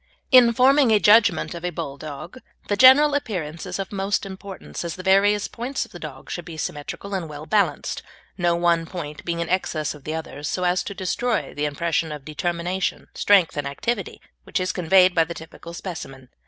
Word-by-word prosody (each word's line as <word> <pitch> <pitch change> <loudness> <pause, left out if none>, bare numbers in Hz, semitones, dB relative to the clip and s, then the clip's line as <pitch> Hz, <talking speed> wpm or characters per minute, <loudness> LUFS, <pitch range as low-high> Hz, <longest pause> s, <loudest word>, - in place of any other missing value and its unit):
In 250 -3 +8
forming 265 +2 +4
a 215 - +5
judgment 210 -1 +4
of 170 0 -8
a 180 - 0
Bulldog 155 - -7 0.3
the 205 - +2
general 265 +6 +7
appearance 180 - -3
is 180 - -4
of 195 -1 -5
most 195 +1 -1
importance, 195 -1 -8
as 170 -1 -4
the 185 - -9
various 200 +2 +3
points 255 +4 -4
of - - -20
the 175 - -10
dog 145 -5 -9
should 175 - -4
be 165 -1 -9
symmetrical 155 +7 -5
and 180 -5 -3
well 150 0 -8
balanced, 200 +5 0 0.3
no 175 -2 +1
one 170 -1 +1
point 150 -5 -7
being 170 -1 -2
in 170 - -3
excess 160 -5 -1
of 150 -2 -14
the 155 +3 -4
others 155 -2 -5
so 180 - -2
as 180 0 +2
to 200 - -6
destroy 220 +5 -1
the 150 - -2
impression 160 +2 -1
of 150 -2 -8
determination, 175 +4 -2
strength, 195 -5 +3
and 145 -1 -2
activity 200 +9 -3 0.2
which - - -2
is 185 0 0
conveyed 185 +1 +4
by 165 - +4
the 170 +1 -7
typical 165 +1 -10
specimen. 135 -7 -8
175 Hz, 195 wpm, -23 LUFS, 160-200 Hz, 0.3 s, In